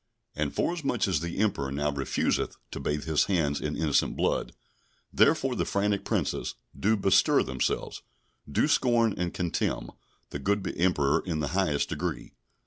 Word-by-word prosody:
And 75 -1 -1
forasmuch 150 -11 0
as 90 -6 +1
the 85 +2 -5
Emperor 95 -11 0
now 75 +1 0
refuseth 70 -2 -1
to - - -5
bathe 75 0 -2
his 80 -2 +2
hands 80 -7 0
in 75 -1 -3
innocent 75 -2 +1
blood, - - 0 0.6
therefore - - +3
the - - 0
frantic 100 0 0
Princes - - -1 0.2
do 110 +2 +2
bestir 95 -1 +4
themselves, 65 -1 -2 0.5
do - - +2
scorn 115 -3 +3
and 90 -1 -2
contemn 90 -2 -2 0.4
the - - -4
good 100 0 0
Emperor 75 -5 +2
in 85 -4 -2
the 75 -2 -1
highest 90 -6 0
degree. - - -4
85 Hz, 150 wpm, -28 LUFS, 75-100 Hz, 0.6 s, bestir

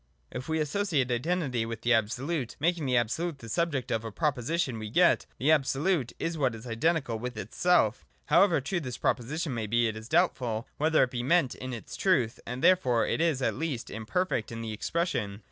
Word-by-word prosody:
If 130 +4 -6
we 160 - +1
associate 150 -4 0
Identity 130 -2 0
with 115 -1 -5
the 120 +1 +3
Absolute, 120 +5 -1
making 165 -1 0
the 125 -1 +3
Absolute 145 +8 -1
the 115 - -11
subject 145 +1 -1
of 115 0 0
a 115 - -5
proposition, 140 -1 -1
we 110 -1 -5
get: 175 +9 +3
The 145 +5 +2
Absolute 145 0 +1
is 165 -1 -3
what 130 -5 +1
is 115 +2 -10
identical 125 0 0
with 125 0 -5
itself 120 - +1 0.2
However 180 -6 +4
true 175 +7 -2
this 125 -6 -5
proposition 145 +5 -1
may 110 -3 -3
be, 115 +2 +2
it 110 - -3
is 110 +2 -9
doubtful 125 -9 +1
whether 155 0 +3
it 125 - -1
be 120 - -2
meant 140 +1 +2
in 130 0 -7
its 120 -3 -7
truth: 130 - +1
and 125 +2 -5
therefore 130 -11 +4
it - - -1
is 155 -6 +1
at - - +1
least 155 -7 -4
imperfect 110 - -2
in 115 0 -5
the 110 -1 -4
expression. 110 - -2
130 Hz, 195 wpm, -29 LUFS, 115-165 Hz, 0.2 s, However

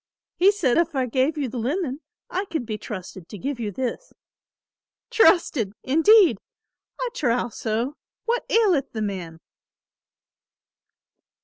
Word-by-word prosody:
He 380 +3 +5
said 335 -10 +1
if 335 -2 0
I 260 -1 +1
gave 260 +6 0
you 285 -3 -1
the 245 +1 -5
linen 280 +3 -2 0.3
I 380 +3 -2
could 320 -9 -4
be 220 -2 -3
trusted 185 -4 -8
to 210 - -8
give 270 +4 -4
you 220 -3 -2
this. 260 - -4 1.0
'Trusted,' 300 - +3
indeed! 345 +8 +5 0.6
I - - -1
trow 245 - 0
so; 230 +6 -3 0.3
what 475 +1 0
aileth 375 - +2
the 220 -2 -2
man?" 180 -5 -5
265 Hz, 130 wpm, -24 LUFS, 225-350 Hz, 1.0 s, He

